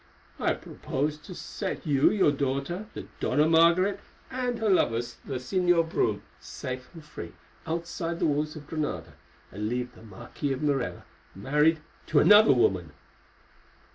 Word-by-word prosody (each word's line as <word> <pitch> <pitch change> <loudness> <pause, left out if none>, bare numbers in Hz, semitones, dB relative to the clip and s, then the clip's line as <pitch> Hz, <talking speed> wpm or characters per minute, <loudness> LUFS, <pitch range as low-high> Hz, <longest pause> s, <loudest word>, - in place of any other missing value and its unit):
"I - - +2
propose 145 +3 -3
to 180 +4 -10
set - - -5
you, 140 -3 +4
your 190 -8 +3
daughter, 140 +8 -2
the - - -6
Dona 150 +1 +2
Margaret, 170 +5 +4 0.3
and 250 -2 -2
her 225 -1 -1
lover, 185 - +3
the 120 +3 -6
Señor 170 +5 +2
Brome, - - 0 0.2
safe 130 0 -7
and 160 -2 -11
free 150 - -8 0.3
outside 170 +1 -3
the - - 0
walls 150 0 0
of 150 -1 -9
Granada, 145 - -4 0.4
and 100 - -8
to 120 - -1
leave 125 0 -3
the - - -16
Marquis 115 +6 -5
of 135 +3 -5
Morella 140 -4 -1 0.3
married 150 - +2 0.3
to - - +1
another 210 +1 +8
woman." 90 - +2
150 Hz, 150 wpm, -27 LUFS, 130-170 Hz, 0.4 s, another